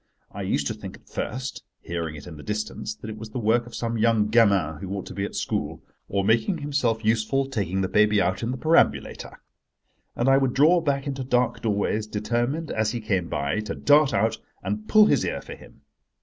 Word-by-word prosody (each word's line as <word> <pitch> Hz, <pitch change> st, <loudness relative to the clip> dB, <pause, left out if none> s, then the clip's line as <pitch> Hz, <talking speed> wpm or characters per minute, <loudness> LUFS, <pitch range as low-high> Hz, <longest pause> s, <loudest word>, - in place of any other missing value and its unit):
I -, -, -7 dB
used -, -, 0 dB
to -, -, -1 dB
think -, -, -9 dB
at -, -, -29 dB
first, 130 Hz, +3 st, -5 dB, 0.2 s
hearing 85 Hz, -2 st, -4 dB
it 75 Hz, -, -10 dB
in 85 Hz, -, -9 dB
the 75 Hz, -, -10 dB
distance, 105 Hz, +2 st, -4 dB
that 110 Hz, -, -9 dB
it 110 Hz, -, -9 dB
was 110 Hz, 0 st, -8 dB
the 110 Hz, -, -6 dB
work 120 Hz, +1 st, +1 dB
of 120 Hz, -, -10 dB
some 115 Hz, -1 st, -2 dB
young 110 Hz, -2 st, +3 dB
gamin 100 Hz, -9 st, +3 dB
who 95 Hz, -, -7 dB
ought 95 Hz, -, -5 dB
to -, -, -8 dB
be 100 Hz, -, -2 dB
at -, -, -7 dB
school, -, -, -3 dB, 0.3 s
or 100 Hz, 0 st, 0 dB
making 115 Hz, -, +2 dB
himself 135 Hz, -7 st, -1 dB
useful 115 Hz, +5 st, +2 dB
taking 95 Hz, -7 st, -2 dB
the 95 Hz, -, 0 dB
baby 105 Hz, +1 st, +3 dB
out 95 Hz, -1 st, 0 dB
in 115 Hz, -, -2 dB
the 130 Hz, -, -2 dB
perambulator: 160 Hz, +5 st, +1 dB, 0.8 s
and 120 Hz, -, 0 dB
I 135 Hz, 0 st, +6 dB
would 135 Hz, -2 st, 0 dB
draw 160 Hz, +6 st, +5 dB
back 140 Hz, -3 st, -1 dB
into 135 Hz, -2 st, -3 dB
dark 125 Hz, -1 st, +1 dB
doorways, 105 Hz, 0 st, 0 dB
determined, 120 Hz, +9 st, -2 dB
as 110 Hz, -1 st, 0 dB
he 120 Hz, -, -2 dB
came 95 Hz, -6 st, -1 dB
by, 75 Hz, +10 st, -1 dB
to 105 Hz, -2 st, -4 dB
dart 145 Hz, -1 st, +4 dB
out 110 Hz, +3 st, +1 dB, 0.2 s
and 105 Hz, +2 st, -3 dB
pull 215 Hz, 0 st, +7 dB
his -, -, +3 dB
ear -, -, -2 dB
for -, -, -9 dB
him. -, -, -16 dB
110 Hz, 220 wpm, -25 LUFS, 100-130 Hz, 0.8 s, pull